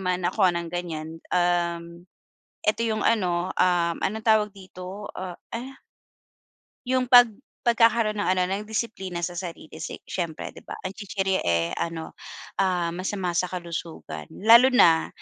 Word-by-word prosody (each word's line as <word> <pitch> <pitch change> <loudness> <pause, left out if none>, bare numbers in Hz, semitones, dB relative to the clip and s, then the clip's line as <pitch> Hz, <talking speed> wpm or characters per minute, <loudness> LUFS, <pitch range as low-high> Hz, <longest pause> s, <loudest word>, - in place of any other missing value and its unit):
man 180 -1 -1
ako 190 -2 +3
ng 170 -1 -3
ganiyan, 165 -2 -5 0.2
um, 170 0 0 0.6
eto 215 +2 +2
yung 220 -1 -1
ano, 180 -5 +1
um, 175 -2 +2
anong 220 +2 -2
tawag 215 -1 +4
dito, 190 +1 -9
ah, 185 -2 -5 0.2
uh 260 +3 -6 1.1
Yung 255 0 +1
pag 245 -2 +8 0.3
pagkakaroon 230 -3 +3
ng - - 0
ano, 185 0 +3
ng 195 +3 -3
disiplina 190 -6 -3
sa 175 0 -2
sarili, 165 -3 -8
si 160 - -5
siyempre, 170 -4 -4
'di - - -15
ba? - - -5
Ang 185 - -3
chichirya, 195 -2 -1
eh, 85 0 +2
ano, 165 -1 -4 0.5
ah, 180 -3 +1
masama 185 +1 -2
sa 180 +1 +1
kalusugan. 170 - -6
Lalo 230 +5 +7
na 170 -11 +5
185 Hz, 145 wpm, -25 LUFS, 170-215 Hz, 1.1 s, pag